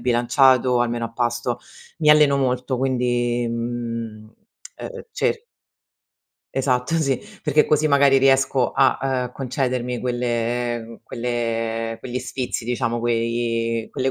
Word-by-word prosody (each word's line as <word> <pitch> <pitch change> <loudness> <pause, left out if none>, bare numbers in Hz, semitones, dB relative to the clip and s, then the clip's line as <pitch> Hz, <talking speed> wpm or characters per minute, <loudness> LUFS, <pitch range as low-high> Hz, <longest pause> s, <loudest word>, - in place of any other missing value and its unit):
bilanciato 125 +1 +3
almeno 120 -1 -1
a 115 - -6
pasto. 120 0 -1 0.4
Mi 150 -2 +5
alleno 150 -2 +6
molto 130 -1 0
quindi, 120 -2 0
mhmm, 115 -2 -4
uhm 110 - -20 0.4
uhm 485 -1 -8
cer 460 - -1 1.1
Esatto, 130 +3 0
sì! 140 -5 +1 0.3
Perché 150 0 +4
così, 150 +1 +2
magari, 140 -2 +5
riesco 135 -1 +3
a, 135 -1 +3 0.3
uhm, - - -19
concedermi 125 -2 -2
quelle 120 -1 -2
quelle 115 -1 -2
quegli 125 +1 -4
sfizi, 130 -3 -4
diciamo, 120 -1 -1
quei 115 -1 -1
quelle 130 +1 0
120 Hz, 120 wpm, -22 LUFS, 115-135 Hz, 1.1 s, alleno